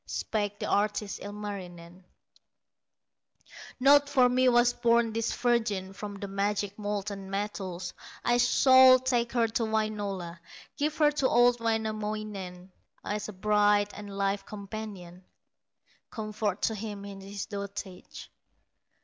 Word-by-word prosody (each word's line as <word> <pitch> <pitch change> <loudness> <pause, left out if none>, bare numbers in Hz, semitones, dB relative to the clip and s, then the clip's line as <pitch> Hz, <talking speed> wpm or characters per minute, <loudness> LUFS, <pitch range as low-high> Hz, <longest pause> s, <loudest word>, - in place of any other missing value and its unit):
Spake 205 -2 -2
the - - -4
artist, 205 0 0
Ilmarinen: 190 -4 -8 1.8
"Not 285 +2 +5
for 255 -3 +5
me 255 +1 +3
was 240 0 +4
born 235 -1 +2
this 225 0 -1
virgin 220 -6 0
From 205 +1 -7
the 200 0 -6
magic 200 0 -1
molten 200 -1 -4
metals; 195 -3 -4 0.3
I 240 - +3
shall 260 +1 +7
take 245 -2 -1
her 235 -2 +3
to 225 - -1
Wainola, 205 -6 -2 0.4
Give 300 +2 -1
her 300 -1 +4
to 280 -3 +1
old 245 0 +4
Wainamoinen, 215 -4 -3 0.3
As 210 +1 -3
a - - -7
bride 205 +1 +2
and 200 -1 -8
life 195 0 0
companion, 200 -4 -8 0.9
Comfort 215 -2 -3
to 225 - +2
him 205 -1 -6
in 200 -1 -9
his 200 +1 -6
dotage." 200 -2 -8
210 Hz, 125 wpm, -29 LUFS, 200-230 Hz, 1.8 s, shall